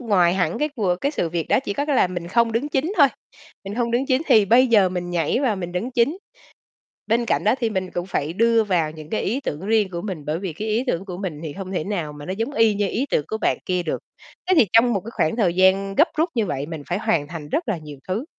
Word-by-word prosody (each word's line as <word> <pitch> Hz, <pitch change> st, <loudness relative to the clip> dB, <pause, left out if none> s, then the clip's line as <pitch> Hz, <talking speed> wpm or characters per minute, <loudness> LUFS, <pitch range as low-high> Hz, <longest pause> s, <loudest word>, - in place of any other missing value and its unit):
ngoài 185 Hz, -7 st, +3 dB
hẳn 175 Hz, -3 st, 0 dB
cái 300 Hz, -, +1 dB
cùa 190 Hz, -6 st, +1 dB
cái 280 Hz, -, +1 dB
sự 175 Hz, -, -1 dB
việc 165 Hz, -1 st, -3 dB
đó, -, -, +4 dB
chỉ -, -, -2 dB
có 285 Hz, +8 st, -2 dB
cái 290 Hz, -3 st, +1 dB
là -, -, +4 dB
mình 175 Hz, -1 st, -6 dB
không 235 Hz, +2 st, +2 dB
đứng 240 Hz, +6 st, -1 dB
chính 300 Hz, +6 st, -1 dB
thôi, 285 Hz, -5 st, +7 dB, 0.6 s
mình 195 Hz, -, -5 dB
hông 235 Hz, 0 st, -1 dB
đứng 245 Hz, +3 st, 0 dB
chính 260 Hz, +1 st, +2 dB
thì 225 Hz, -7 st, +6 dB
bây 240 Hz, +6 st, +5 dB
giờ 210 Hz, -6 st, +4 dB
mình 180 Hz, -1 st, -4 dB
nhảy 170 Hz, -, 0 dB
vào 240 Hz, -8 st, +1 dB
mình 175 Hz, -2 st, -5 dB
đứng 205 Hz, +8 st, -3 dB
chính. 260 Hz, +8 st, +1 dB, 0.9 s
Bên 230 Hz, +2 st, +1 dB
cạnh -, -, 0 dB
đó 215 Hz, +3 st, +4 dB
thì 230 Hz, -2 st, 0 dB
mình 190 Hz, -3 st, -2 dB
cũng 175 Hz, +1 st, -4 dB
phải 155 Hz, -4 st, -2 dB
đưa 230 Hz, +3 st, +3 dB
vào 175 Hz, -6 st, +1 dB
những 155 Hz, 0 st, -11 dB
cái 220 Hz, -, -1 dB
ý 240 Hz, +8 st, -1 dB
tưởng 150 Hz, -, -4 dB
riêng 215 Hz, -3 st, +2 dB
của 170 Hz, -1 st, -4 dB
mình, 185 Hz, -8 st, -5 dB
bởi 150 Hz, +2 st, -2 dB
vì 190 Hz, -2 st, -4 dB
cái 210 Hz, +8 st, -5 dB
ý 220 Hz, +4 st, 0 dB
tưởng 190 Hz, -6 st, -1 dB
của 185 Hz, -3 st, -7 dB
mình 180 Hz, -7 st, -5 dB
thì 155 Hz, -, -5 dB
hông 190 Hz, +3 st, -7 dB
thể 180 Hz, -, -2 dB
nào 175 Hz, -7 st, -3 dB
mà 145 Hz, 0 st, -10 dB
nó 185 Hz, -, -3 dB
giống 225 Hz, +8 st, -3 dB
y 225 Hz, -4 st, +3 dB
như 205 Hz, 0 st, 0 dB
ý 265 Hz, +8 st, -1 dB
tưởng 150 Hz, -, +1 dB
của 220 Hz, -, -3 dB
bạn -, -, +1 dB
kia 180 Hz, -1 st, 0 dB
được. 165 Hz, -, -3 dB, 0.5 s
Thế 375 Hz, -, +5 dB
thì 235 Hz, -, +6 dB
trong 235 Hz, +2 st, +5 dB
một 200 Hz, -, 0 dB
cái 220 Hz, -, -9 dB
khoảng 160 Hz, -5 st, 0 dB
thời 190 Hz, -8 st, +2 dB
gian 190 Hz, +2 st, +3 dB
gấp 315 Hz, -, +5 dB
rút 320 Hz, +3 st, +1 dB
như 225 Hz, -4 st, +1 dB
vậy, 140 Hz, -4 st, -3 dB
mình 160 Hz, -2 st, -6 dB
phải 175 Hz, -, -1 dB
hoàn 170 Hz, -10 st, 0 dB
thành 155 Hz, -2 st, -7 dB
rất 315 Hz, -, -2 dB
là 205 Hz, -5 st, 0 dB
nhiều 150 Hz, -2 st, -10 dB
thứ. 200 Hz, +8 st, -2 dB
195 Hz, 285 wpm, -22 LUFS, 175-235 Hz, 0.9 s, thôi